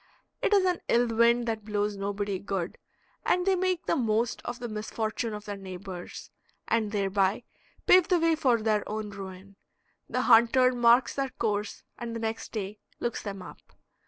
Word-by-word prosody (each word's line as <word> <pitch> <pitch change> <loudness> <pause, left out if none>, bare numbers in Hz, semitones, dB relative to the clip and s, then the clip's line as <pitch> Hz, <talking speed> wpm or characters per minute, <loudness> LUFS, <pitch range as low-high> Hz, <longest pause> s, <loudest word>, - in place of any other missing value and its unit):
It - - +1
is 400 -2 +5
an 360 -2 +1
ill 240 0 +3
wind 235 +1 +4
that 220 -2 -2
blows 210 0 -1
nobody 200 -1 -2
good, 190 -3 -4 0.4
and 360 0 +2
they 385 -1 +3
make 370 -1 0
the - - +1
most 230 -3 0
of 240 - -4
the 240 - -5
misfortune 220 +1 -3
of 210 0 -7
their 205 -1 -5
neighbors; 185 -1 -8 0.4
and 220 -2 +1
thereby 200 +1 +1 0.4
pave 365 -2 +6
the 360 - +3
way 330 0 +3
for 255 -8 +2
their 215 -2 +2
own 215 0 -4
ruin. 195 0 -9 0.5
The - - 0
hunter 255 +3 +5
marks 240 +1 +4
their 275 -1 -1
course 210 -4 -2 0.2
and 235 -1 -5
the - - -3
next 225 0 -4
day 210 -1 -5 0.2
looks 240 - -2
them 195 -3 -6
up. - - -11
220 Hz, 175 wpm, -28 LUFS, 205-240 Hz, 0.5 s, pave